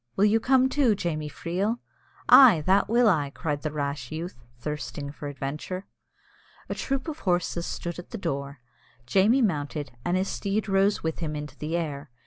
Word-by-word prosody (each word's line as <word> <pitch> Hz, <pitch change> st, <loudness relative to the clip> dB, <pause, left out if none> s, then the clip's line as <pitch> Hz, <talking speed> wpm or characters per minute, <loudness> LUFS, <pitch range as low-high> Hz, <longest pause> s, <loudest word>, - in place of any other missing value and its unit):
Will 200 Hz, -, +4 dB
you 215 Hz, +2 st, +4 dB
come 260 Hz, +2 st, +4 dB
too, 260 Hz, -5 st, +2 dB
Jamie 155 Hz, -5 st, -3 dB
Freel?" 185 Hz, +9 st, -2 dB, 0.5 s
"Ay, 235 Hz, -, +9 dB
that 195 Hz, +2 st, +3 dB
will 235 Hz, +1 st, +4 dB
I!" 150 Hz, -8 st, +2 dB
cried 145 Hz, 0 st, -3 dB
the 155 Hz, -, -3 dB
rash 140 Hz, -3 st, -3 dB
youth, 160 Hz, -5 st, -6 dB
thirsting 145 Hz, +1 st, -5 dB
for 145 Hz, 0 st, -7 dB
adventure. 145 Hz, +7 st, -5 dB, 0.8 s
A -, -, -3 dB
troop 275 Hz, +2 st, -2 dB
of 315 Hz, -1 st, -5 dB
horses 175 Hz, -2 st, 0 dB
stood 170 Hz, 0 st, -5 dB
at 175 Hz, -, -10 dB
the 230 Hz, -, -5 dB
door. 140 Hz, -, -4 dB, 0.4 s
Jamie 210 Hz, -, +4 dB
mounted, 150 Hz, -6 st, -1 dB
and 175 Hz, +1 st, +1 dB
his 190 Hz, +1 st, 0 dB
steed 205 Hz, +2 st, -2 dB
rose 195 Hz, +1 st, +2 dB
with 160 Hz, -1 st, -2 dB
him 155 Hz, -3 st, -3 dB
into 150 Hz, -1 st, -6 dB
the 155 Hz, +5 st, -2 dB
air. 145 Hz, -3 st, -4 dB
170 Hz, 175 wpm, -26 LUFS, 150-205 Hz, 0.8 s, Ay